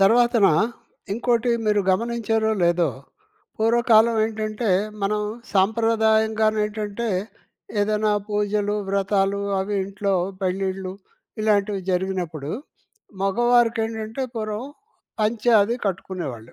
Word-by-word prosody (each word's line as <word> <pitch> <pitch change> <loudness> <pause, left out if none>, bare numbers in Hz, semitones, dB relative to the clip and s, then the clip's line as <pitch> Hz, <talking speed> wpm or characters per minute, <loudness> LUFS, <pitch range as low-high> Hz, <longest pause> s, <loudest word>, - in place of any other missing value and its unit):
తర్వాతనా 230 +1 +5 0.6
ఇంకోటి 240 +2 +1 0.2
మీరు 210 -1 +3
గమనించారో 225 +1 0
లేదో. 170 -1 +3 0.7
పూర్వకాలమెంటంటే, 220 -1 +2 0.3
మనం 210 +2 +1 0.3
సాంప్రదాయంగానేంటంటే, 220 0 +1 0.7
ఏదైనా 210 +1 +1 0.2
పూజలు, 205 0 0
వ్రతాలు 195 0 +1 0.2
అవి 200 +2 -2
ఇంట్లో 200 +1 -2 0.3
పెళ్ళిళ్లు, 190 0 -2 0.5
ఇలాంటివి 205 -2 +1
జరిగినప్పుడు 180 -5 -2 0.7
మగవారికేంటంటే 225 +1 +1
పూర్వం 215 +1 -3 0.6
పంచె 220 +2 +1
అది 225 +4 0
కట్టుకునేవాళ్ళు. 175 - -5
210 Hz, 75 wpm, -23 LUFS, 195-225 Hz, 0.7 s, తర్వాతనా